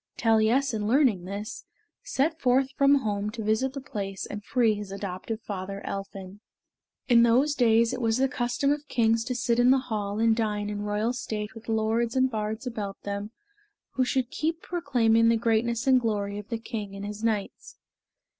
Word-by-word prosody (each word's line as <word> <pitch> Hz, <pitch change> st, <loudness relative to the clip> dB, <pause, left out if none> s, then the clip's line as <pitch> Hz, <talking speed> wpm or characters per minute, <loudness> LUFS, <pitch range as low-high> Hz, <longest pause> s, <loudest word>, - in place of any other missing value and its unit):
Taliessin 225 Hz, 0 st, +2 dB
learning 235 Hz, -8 st, +3 dB
this, 200 Hz, +3 st, -6 dB, 0.4 s
set 315 Hz, +4 st, -1 dB
forth 260 Hz, +1 st, +2 dB
from 280 Hz, +1 st, +4 dB
home 205 Hz, 0 st, -1 dB
to 220 Hz, 0 st, -6 dB
visit 220 Hz, +5 st, 0 dB
the 275 Hz, -, -5 dB
palace 200 Hz, -7 st, -5 dB
and 210 Hz, 0 st, -7 dB
free 230 Hz, -1 st, +2 dB
his 205 Hz, -2 st, -6 dB
adoptive 200 Hz, +2 st, -5 dB
father, 195 Hz, -1 st, -5 dB
Elphin. 195 Hz, 0 st, -6 dB, 0.7 s
In 240 Hz, -3 st, +6 dB
those 250 Hz, +6 st, +4 dB
days 230 Hz, -2 st, +3 dB
it 255 Hz, -, -4 dB
was 225 Hz, 0 st, +1 dB
the 270 Hz, +1 st, +3 dB
custom 260 Hz, +1 st, 0 dB
of 290 Hz, 0 st, -2 dB
kings 225 Hz, -2 st, +2 dB
to 250 Hz, -, -2 dB
sit 235 Hz, 0 st, +1 dB
in 245 Hz, +1 st, +5 dB
the 265 Hz, -, +6 dB
hall 210 Hz, -5 st, -3 dB
and 225 Hz, 0 st, +3 dB
dine 210 Hz, -2 st, -1 dB
in 205 Hz, 0 st, -4 dB
royal 210 Hz, +3 st, -1 dB
state 215 Hz, -4 st, -4 dB
with 225 Hz, 0 st, -11 dB
lords 225 Hz, +2 st, 0 dB
and 260 Hz, 0 st, +3 dB
bards 220 Hz, +2 st, -3 dB
about 210 Hz, -5 st, -5 dB
them 200 Hz, +1 st, -4 dB, 0.6 s
who 260 Hz, -, +1 dB
should 255 Hz, 0 st, -1 dB
keep 325 Hz, +2 st, -2 dB
proclaiming 235 Hz, -9 st, +2 dB
the 230 Hz, -, +3 dB
greatness 230 Hz, +1 st, 0 dB
and 260 Hz, -2 st, +5 dB
glory 205 Hz, -3 st, -2 dB
of 210 Hz, -, -11 dB
the 230 Hz, -, -2 dB
king 210 Hz, -3 st, -6 dB
and 200 Hz, +1 st, -6 dB
his 210 Hz, +1 st, -6 dB
knights. 215 Hz, -3 st, -3 dB
225 Hz, 185 wpm, -27 LUFS, 210-250 Hz, 0.7 s, In